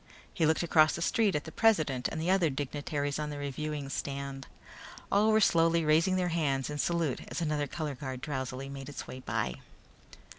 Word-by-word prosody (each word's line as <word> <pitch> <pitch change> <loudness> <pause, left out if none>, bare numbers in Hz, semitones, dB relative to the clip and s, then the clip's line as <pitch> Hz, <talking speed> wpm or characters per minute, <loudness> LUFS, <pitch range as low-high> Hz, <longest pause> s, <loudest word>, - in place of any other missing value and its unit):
He 160 -4 +2
looked 160 +2 +2
across 160 -2 +4
the 170 - -5
street 210 -2 +2
at 150 - -1
the 160 - -9
president 155 - +2
and 160 - -5
the 170 +3 +1
other 185 -4 +3
dignitaries 145 +1 -3
on 150 0 -2
the 145 - -5
reviewing 145 +1 -4
stand. 140 0 -4 0.6
All 210 +2 +4
were 215 - +5
slowly 165 -4 +3
raising 165 +5 +4
their 180 -1 +1
hands 145 -5 0
in 150 - -4
salute 165 -4 0
as - - -4
another 150 -3 0
color 155 -1 -4
guard 130 -1 -6
drowsily 135 -1 -4
made 140 0 -7
its 145 - -7
way 130 - -8
by. 65 - -2
150 Hz, 190 wpm, -30 LUFS, 140-165 Hz, 0.6 s, were